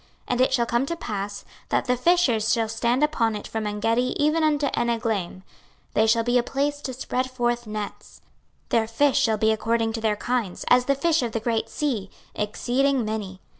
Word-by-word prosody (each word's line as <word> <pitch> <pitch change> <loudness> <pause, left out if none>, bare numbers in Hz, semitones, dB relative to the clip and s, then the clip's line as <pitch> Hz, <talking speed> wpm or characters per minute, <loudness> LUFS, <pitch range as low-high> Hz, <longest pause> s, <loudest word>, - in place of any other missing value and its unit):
26:047:010 - - -31 0.2
And 250 0 +1
it 260 - +3
shall 240 -2 +1
come 235 +3 +1
to 335 - -2
pass, 205 -8 -5 0.2
that - - +1
the 250 - +2
fishers 250 -6 +2
shall 230 -2 +2
stand 235 +4 0
upon 235 -8 +1
it 210 - -6
from 220 -1 -3
Engedi 225 +4 0
even 305 +2 +2
unto 300 -2 +2
Eneglaim; 225 -6 -1 0.5
they 220 - +3
shall 230 +1 +3
be 245 +1 +3
a - - +3
place 285 +3 -2
to 265 - -4
spread 255 0 -2
forth 240 -2 -1
nets; 210 -1 -7 0.5
their 225 -1 +2
fish 275 +5 +2
shall 220 -2 +2
be 220 +1 +3
according 225 +1 0
to 225 - -4
their 215 -1 +1
kinds, 235 -4 -2
as 250 0 +5
the 275 - +2
fish 325 +3 +2
of 235 -3 -3
the 225 - 0
great 225 0 -1
sea, 235 -10 -2 0.3
exceeding 250 +4 0
many. 205 -3 -4
235 Hz, 200 wpm, -24 LUFS, 220-260 Hz, 0.5 s, as